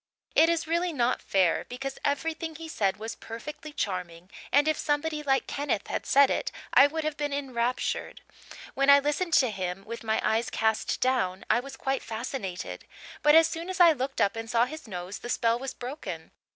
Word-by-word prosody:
It 325 - +6
is 335 -1 +1
really 340 +2 0
not 250 -4 0
fair, 185 -4 +2
because 270 +2 -5
everything 320 +3 -2
he 325 +1 -8
said 200 -11 0
was 220 +2 -5
perfectly 300 +7 -8
charming 180 - -4 0.2
and 290 +2 +4
if 310 - +3
somebody 300 +1 -1
like 270 -2 +1
Kenneth 280 -8 -2
had - - -3
said 280 0 +5
it - - -1 0.2
I 275 - +8
would 320 +2 -3
have 305 -1 -2
been 290 0 -2
enraptured. 255 -3 -2 0.5
When 275 +1 +2
I 280 - +10
listened 295 +5 -1
to 255 -6 +4
him 190 -1 -4
with 230 +1 -7
my 220 -1 +1
eyes 225 +1 +1
cast 220 -1 0
down 195 -8 0
I - - +4
was 265 +1 -9
quite 270 0 -1
fascinated; 220 -5 -5 0.3
but 295 +1 +6
as 325 0 +8
soon 330 +2 -5
as 375 - -4
I 345 -2 +8
looked 270 -2 -3
up 200 - +2
and 225 0 -6
saw 235 0 +3
his 310 +1 -9
nose 185 0 -6
the 240 - -8
spell 230 -1 +1
was 270 0 -5
broken. 240 - -7
265 Hz, 195 wpm, -28 LUFS, 220-300 Hz, 0.5 s, I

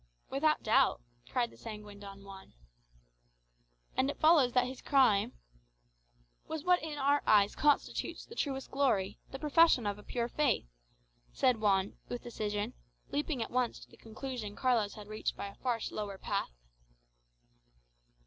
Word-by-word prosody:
"Without 305 +3 +2
doubt," 255 +5 +3 0.3
cried 240 -2 0
the - - -17
sanguine 210 -2 -9
Don 200 -1 -10
Juan. 195 - -12 1.4
"And 265 - +2
it - - -4
follows 310 -6 +5
that 250 -1 +4
his 255 +1 -7
crime 255 -8 +3 0.6
" - - -39
"Was 315 -2 -4
what 360 0 +4
in 310 -2 -5
our 285 +1 +3
eyes 205 -1 +5
constitutes 295 -2 +1
the - - -12
truest 270 - -3
glory, 210 -8 +1
the 270 - -6
profession 300 -3 +4
of 205 0 -2
a - - -13
pure 235 +1 -2
faith," 280 -2 +1 0.7
said 245 -4 +2
Juan 195 -2 +1
with 245 - -5
decision, 210 -3 -3 0.4
leaping 290 -4 -1
at - - -9
once 250 -1 0
to - - -15
the - - -15
conclusion 225 -2 -6
Carlos 235 -5 +1
had 210 -1 -10
reached 215 0 -3
by 200 - -4
a - - -12
far 245 0 -1
slower 205 -2 -4
path. - - -2
240 Hz, 155 wpm, -32 LUFS, 205-275 Hz, 1.4 s, follows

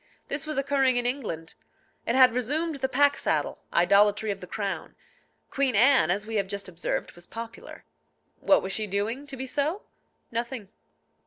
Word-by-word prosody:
This 280 +2 -3
was 305 - -3
occurring 270 -2 +2
in 245 - +1
England. 215 - -3 0.5
It 235 - +1
had 255 -2 +7
resumed 295 +7 0
the 265 -1 -1
pack 285 +2 +3
saddle, - - -1
idolatry 205 +4 +4
of 195 - -5
the 180 - -8
crown. 195 -5 -4 0.6
Queen 270 -4 +1
Anne, 250 - +5
as 200 +4 0
we 220 0 -3
have 200 -1 0
just 200 0 -4
observed, 175 -1 -3
was 175 0 -12
popular. 230 0 -9 0.5
What 290 - +4
was 190 - -3
she 215 +1 0
doing 215 +8 -2
to 275 -2 -7
be 260 - -4
so? 300 +9 -1 0.5
Nothing. 235 -3 -3
235 Hz, 170 wpm, -27 LUFS, 200-275 Hz, 0.6 s, had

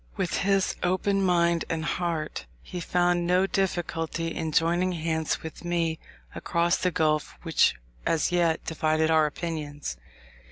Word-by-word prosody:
With 190 -3 -1
his 195 0 +1
open 185 +2 +1
mind 170 -2 +3
and 160 -1 -2
heart, 160 - -2 0.2
he 180 - -6
found 175 0 +1
no 180 +2 +4
difficulty 165 -4 -1
in 160 -1 -3
joining 175 +4 +2
hands 160 -1 -1
with 160 +2 -8
me 170 -2 0 0.3
across 170 0 +1
the 180 - +1
gulf 155 -3 0
which - - +3 0.3
as 160 0 +1
yet 170 -2 +1
divided 160 0 +1
our 155 -1 +5
opinions. 145 - -5
170 Hz, 135 wpm, -27 LUFS, 160-180 Hz, 0.3 s, our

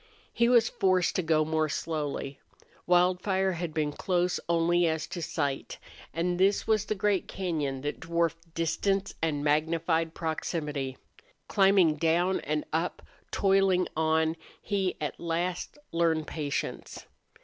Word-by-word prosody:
He 235 0 +3
was 235 -2 +5
forced 185 -2 +1
to - - +2
go 160 -2 +2
more 155 0 0
slowly. 145 -3 -3 0.5
Wildfire 185 +2 +3
had 175 -2 -3
been 150 -1 -1
close 180 +3 0
only 170 +1 +3
as 160 -1 -1
to 175 0 -6
sight. 145 -4 -2 0.3
And 175 +3 -1
this 195 +2 +3
was 215 -1 +2
the 215 - -1
great 200 -1 +1
cañon 150 -8 -3
that 145 - -3
dwarfed 165 0 -2
distance 195 +4 0
and 150 -3 0
magnified 160 +2 +1
proximity. 150 -4 -3 0.5
Climbing 190 -6 +4
down 170 +4 +2
and 150 +1 -2
up, 165 +3 -1 0.3
toiling 195 -2 +3
on, 160 +1 +1 0.2
he 195 -3 -1
at 150 - -4
last 175 - -2
learned 165 -2 +1
patience. 145 -3 -4
165 Hz, 130 wpm, -28 LUFS, 155-185 Hz, 0.5 s, was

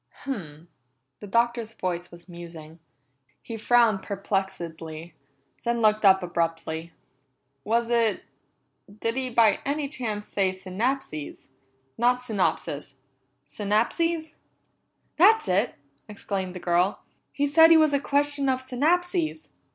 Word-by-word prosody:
"Hum!" 170 - -6 0.5
The 205 - -9
Doctor's 235 +1 0
voice 180 -2 -3
was 170 +1 -15
musing. 170 -2 -11 0.6
He 230 - -6
frowned 225 -2 +3
perplexedly, 175 -5 -4 0.5
then 235 0 -1
looked 215 -1 +3
up 190 -1 +6
abruptly. 165 -1 -2 0.7
"Was 235 +2 0
it 230 -3 +2 0.8
did 230 +1 -1
he 260 -1 -1
by 225 -4 +4
any 285 +1 -1
chance 225 -7 -4
say 190 -2 0
synapses? 190 - -4 0.5
Not 250 +1 +2
synopsis 165 - -2 0.5
synapses?" 300 - -1 0.8
"That's 410 - +5
it!" 195 +5 +1 0.3
exclaimed 195 -3 -4
the - - -5
girl. 180 +3 +1 0.3
"He 285 - 0
said 320 +3 +7
he 330 - +8
was 310 -2 +4
a 280 - +3
question 285 0 +1
of 260 -1 +1
synapses. 315 +6 0
215 Hz, 115 wpm, -26 LUFS, 180-265 Hz, 0.8 s, he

